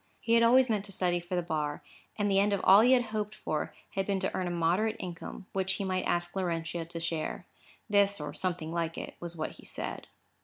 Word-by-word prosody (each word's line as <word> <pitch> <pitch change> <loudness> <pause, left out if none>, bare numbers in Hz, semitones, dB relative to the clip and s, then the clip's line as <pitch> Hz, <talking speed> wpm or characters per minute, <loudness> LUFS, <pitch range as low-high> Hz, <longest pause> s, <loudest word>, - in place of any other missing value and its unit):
He 230 - 0
had 230 - +6
always 250 +3 +6
meant 215 -4 0
to 200 - -8
study 180 -2 +1
for 175 +1 -4
the 175 - 0
bar, 150 -3 -2 0.3
and 205 -1 +1
the 195 -1 +3
end 205 +1 +3
of 200 - 0
all 195 +2 +8
he 250 +3 +6
had 250 -1 +4
hoped 215 0 -2
for 155 - -2 0.2
had 195 0 -2
been 200 -1 +1
to 190 - -1
earn 185 - -1
a - - -1
moderate 175 +6 +1
income, 175 +1 -7
which 190 0 0
he 200 - -2
might 185 -1 -1
ask 175 +2 -1
Laurentia 170 -2 -2
to 170 0 -6
share. 165 +1 -3 0.4
This, 200 -2 +3
or 150 -1 -5
something 175 -3 -2
like 165 -1 -2
it, - - -6
was 170 0 -5
what 155 - -2
he - - -15
said. - - -5
185 Hz, 235 wpm, -30 LUFS, 170-205 Hz, 0.4 s, all